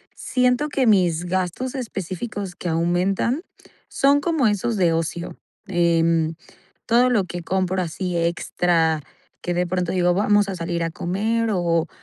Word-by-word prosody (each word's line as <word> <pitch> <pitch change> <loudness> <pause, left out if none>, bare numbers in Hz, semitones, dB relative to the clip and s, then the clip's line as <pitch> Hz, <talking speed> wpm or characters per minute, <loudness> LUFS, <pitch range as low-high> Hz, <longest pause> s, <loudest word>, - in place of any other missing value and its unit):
siento 250 +4 +1
que 270 -3 +1
mis 180 -5 +3
gastos 185 +8 -2
específicos 200 -4 -5
que 175 - -4
aumentan 180 - 0 0.5
son 280 +1 +3
como 320 -6 +1
esos 210 +2 0
de 170 -3 +3
ocio, 165 +1 -3 0.3
em, 165 -2 +2 0.5
todo 245 +2 +4
lo 220 -6 +2
que 175 0 -6
compro 185 +1 0
así 180 +1 -3
extra, 165 -1 +1 0.4
que 175 - -2
de 180 0 +1
pronto 180 -1 -1
digo: 180 -1 +2
"Vamos 205 +1 +3
a 190 - -3
salir 170 0 -2
a 165 - -2
comer 220 +7 -1
o 170 -3 +1
180 Hz, 145 wpm, -22 LUFS, 170-220 Hz, 0.5 s, todo